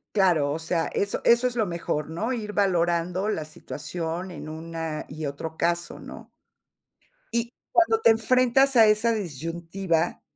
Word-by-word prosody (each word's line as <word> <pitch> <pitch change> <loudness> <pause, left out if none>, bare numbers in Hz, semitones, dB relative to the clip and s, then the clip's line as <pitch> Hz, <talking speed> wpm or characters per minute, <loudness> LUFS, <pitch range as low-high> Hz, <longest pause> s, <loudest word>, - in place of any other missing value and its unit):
Claro, 170 -8 +3
o 160 - -2
sea, 165 0 -1
eso 200 0 -1
eso 235 +2 +5
es 245 - -4
lo 220 -3 +2
mejor, 170 -4 -3
¿no?, 220 +10 -2
ir 210 -3 -4
valorando 180 0 +1
la 160 -7 -2
situación 165 +4 -5
en 165 -3 -8
una 160 0 -5
y 155 +1 -6
otro 155 +3 -5
caso, 170 0 -1
¿no? - - -11 1.1
Y 235 0 0 0.2
cuando 395 +6 +4
te 335 - +6
enfrentas 255 +4 +3
a 225 -2 +8
esa 215 +2 +3
disyuntiva, 170 - -2
175 Hz, 150 wpm, -25 LUFS, 165-220 Hz, 1.1 s, a